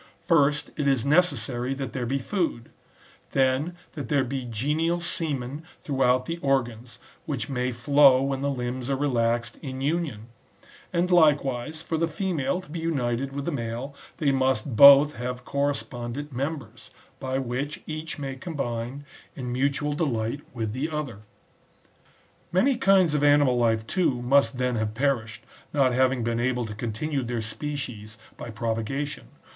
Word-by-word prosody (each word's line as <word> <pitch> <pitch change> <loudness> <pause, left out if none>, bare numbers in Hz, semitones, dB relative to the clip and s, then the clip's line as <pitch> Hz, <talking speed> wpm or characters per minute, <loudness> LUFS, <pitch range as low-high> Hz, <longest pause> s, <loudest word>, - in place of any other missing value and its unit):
First 150 -3 +2
it 145 -2 0
is 135 -4 +2
necessary 135 -5 +1
that 135 -2 -4
^ - - -15
there 125 -3 -2
be 135 +3 0
food; 140 - -2 0.6
then 135 +6 +1 0.2
that 145 -7 -7
there 140 -2 +3
be 130 0 -4
genial 150 +9 0
semen 150 -5 -2 0.2
throughout 130 -3 +2
the 165 +3 -3
organs, 120 -5 -1 0.3
which 135 -6 -3
may 125 -1 -1
flow 135 +2 +5
when 135 -1 -1
the 140 - 0
limbs 125 -1 -3
are 135 - +2
relaxed 120 -4 0
in 130 -3 -6
union; 140 -7 -2 0.6
and 175 +2 0
likewise, 150 -2 +2
for 160 - -2
the 165 +1 +1
female 180 -1 -1
to 180 - -15
be 170 - -4
united 135 -5 -1
with 140 0 -4
the 170 - -1
male, 120 +1 -4 0.2
they 145 -3 +2
must 130 -2 0
both 140 +4 +9
have 125 +1 -5
correspondent 140 -1 -3
members, 130 -3 -5 0.3
by 130 -1 -2
which 135 +3 -3
each 155 0 -5
may 135 -2 -4
combine 135 -3 -4 0.3
in 125 -2 -5
mutual 140 +3 0
delight 135 -4 -1
with 110 -4 -3
the 135 +6 -2
other. 150 -9 -4 1.3
Many 250 +10 +3
kinds 195 -7 +4
of 150 -1 +1
animal 145 -3 +5
life, 115 -2 +2
too, 165 -5 +1
must 130 -1 +3
then 125 -1 0
have 110 -1 -2
perished, 115 -4 -1 0.3
not 135 -4 +3
having 130 -1 +2
been 115 0 -1
able 125 0 0
to 105 - -6
continue 120 +7 -2
their 120 -2 -3
species 115 -3 -5 0.2
by 120 - -8
propagation. 115 - -3
135 Hz, 155 wpm, -26 LUFS, 120-145 Hz, 1.3 s, both